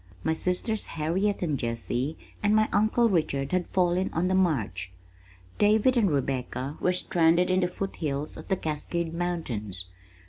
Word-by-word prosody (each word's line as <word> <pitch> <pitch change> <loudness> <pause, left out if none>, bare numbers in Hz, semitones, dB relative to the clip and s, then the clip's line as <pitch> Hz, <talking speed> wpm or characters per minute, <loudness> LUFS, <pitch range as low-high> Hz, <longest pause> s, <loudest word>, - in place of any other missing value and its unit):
My 160 - +2
sisters 185 +6 -1
Harriet 185 +6 -1
and 150 -6 0
Jessie 120 +5 -2 0.2
and 210 +1 +3
my 215 0 +4
uncle 220 +3 +3
Richard 140 -8 0
had 180 -1 0
fallen 180 0 +1
on 175 +3 +1
the - - +1
march. 155 - 0 0.7
David 215 +5 +4
and 220 -5 +3
Rebecca 135 -1 -2
were 180 - +3
stranded 175 0 +3
in 185 - +3
the 180 - +2
foot 195 +2 -5
hills 145 -1 -3
of - - -9
the 190 - +1
Cascade 160 +2 -3
mountains. 120 - -3
175 Hz, 160 wpm, -27 LUFS, 140-190 Hz, 0.7 s, my